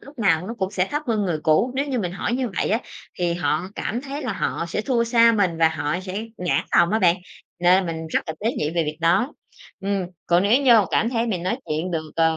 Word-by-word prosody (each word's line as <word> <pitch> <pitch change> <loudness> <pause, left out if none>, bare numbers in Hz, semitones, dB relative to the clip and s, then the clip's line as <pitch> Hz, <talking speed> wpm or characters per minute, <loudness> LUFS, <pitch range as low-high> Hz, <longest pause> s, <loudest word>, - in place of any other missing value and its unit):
lúc 280 -1 -15
nào 180 -4 +2
nó 230 - -5
cũng 190 -1 -1
sẽ 185 -1 0
thấp 295 +1 -1
hơn 220 -3 +1
người 175 -5 -1
cũ. 190 +11 +3
Nếu 280 +2 0
như 260 -3 -1
mình 180 -4 -2
hỏi 195 - -2
như 255 -1 -1
vậy - - 0
á, 220 - +3 0.4
thì 175 -1 0
họ 155 -1 0
cảm 235 - -3
thấy 280 +2 -6
là 250 - -2
họ 175 - -2
sẽ 210 - -2
thua 235 -1 +1
xa 230 0 +5
mình 195 -6 +1
và 160 -1 +5
họ 150 0 -2
sẽ 190 +4 -5
nản 180 -1 0
lòng 175 0 +4
á 220 - +2
bạn 175 -3 +4 0.4
nên 180 +1 +4
mình 160 -1 -4
rất - - 0
là 160 - -4
tế 225 +3 0
nhị 150 - -1
về 165 0 0
việc 155 0 -4
đó. 175 - +2 0.5
Ừm, 195 -2 -1 0.2
còn 175 +2 +3
nếu 240 +8 +3 0.2
vô 195 - -1
cảm 230 - +2
thấy 235 -1 0
mình 185 -7 -2
nói 210 +7 -1
chuyện 155 +4 -2
được, 160 -2 -3
ờ, 160 -1 +3
185 Hz, 255 wpm, -23 LUFS, 165-230 Hz, 0.5 s, xa